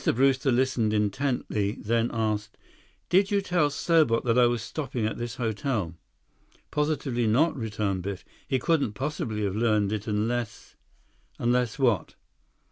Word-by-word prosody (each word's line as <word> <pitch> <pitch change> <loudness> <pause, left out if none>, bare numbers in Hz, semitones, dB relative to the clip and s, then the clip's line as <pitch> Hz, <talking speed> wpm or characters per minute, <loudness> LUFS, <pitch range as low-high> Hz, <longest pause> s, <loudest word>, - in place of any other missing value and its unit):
Brewster 135 +1 +3
listened 120 -4 +1
intently, 105 -2 0
then 115 +2 0
asked: 110 -2 -2 0.5
"Did 190 +2 +4
you 205 -1 +2
tell 175 -6 +1
Serbot 150 -5 +2
that 115 -2 +2
I 125 -1 +6
was 120 -2 -1
stopping 130 -5 -3
at 110 - -3
this 120 -2 -4
hotel?" 110 - -2 0.8
"Positively 145 -6 0
not," 150 +10 +3
returned 105 -6 -2
Biff. 95 0 -5 0.2
"He 130 - +1
couldn't 145 -5 +1
possibly 115 -5 -3
have 100 -1 -1
learned 105 -3 +2
it—unless—" 110 +1 -2 0.6
"Unless 120 0 +1
what?" 120 - +1
120 Hz, 130 wpm, -27 LUFS, 105-135 Hz, 0.8 s, I